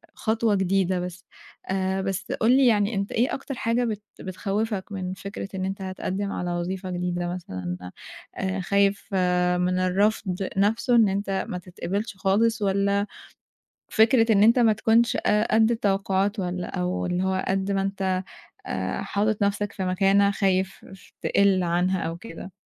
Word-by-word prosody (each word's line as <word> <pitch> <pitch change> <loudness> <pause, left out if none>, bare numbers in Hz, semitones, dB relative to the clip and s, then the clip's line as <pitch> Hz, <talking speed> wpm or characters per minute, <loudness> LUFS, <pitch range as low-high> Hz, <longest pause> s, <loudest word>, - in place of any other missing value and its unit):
خطوة 220 -1 +1
جديدة 190 -1 +1
بس. 180 +1 -6 0.4
آآ، 190 0 0
بس 195 0 -3
قُل 230 +2 +2
لي 270 -2 +5
يعني 210 -1 +2
أنت 200 +1 -2
إيه 240 +3 +1
أكتر 270 0 -5
حاجة 235 +1 0
بت 215 -3 -3 0.2
بتخوِّفك 200 +2 -3
من 185 -2 -4
فكرة 195 0 -6
إن 185 0 -2
أنت 195 +1 -4
هتقدِّم 190 +1 -3
على 175 0 -3
وظيفة 185 +2 -3
جديدة 175 0 -2
مثلًا؟ 90 - -6 0.4
آآ، 190 0 -2
خايف 200 +2 +1 0.5
من 180 +1 +1
الرفض 190 0 0
نفسه، 225 +5 +2
إن 225 -4 +5
أنت 195 0 -1
ما 180 - -3
تتقبَّلش 190 +3 -4
خالص، 215 +3 +2
والّا 200 +1 +1 0.8
فكرة 225 +1 +4
إن 205 -1 +5
أنت 230 +3 +5
ما 225 -2 +5
تكونش، 225 +2 +2
آآ، 210 +1 +3
قد 220 +1 +4
التوقُّعات، 200 -1 0
والّا 180 -1 -3
أو 180 +1 -1
اللي 180 +1 -1
هو 190 0 0
قد 195 +1 0
ما 195 0 +1
أنت، 190 -1 -1 0.4
آآ، 95 0 -3
حاطِّط 210 +1 -1
نفسك 205 0 0
في 190 - -3
مكانة، 195 +2 +3
خايف 190 -1 0 0.4
تقِل 195 -2 +3
عنها 180 +2 +1
أو 165 +1 -3
كده؟ 180 -1 -9
195 Hz, 155 wpm, -25 LUFS, 185-210 Hz, 0.8 s, لي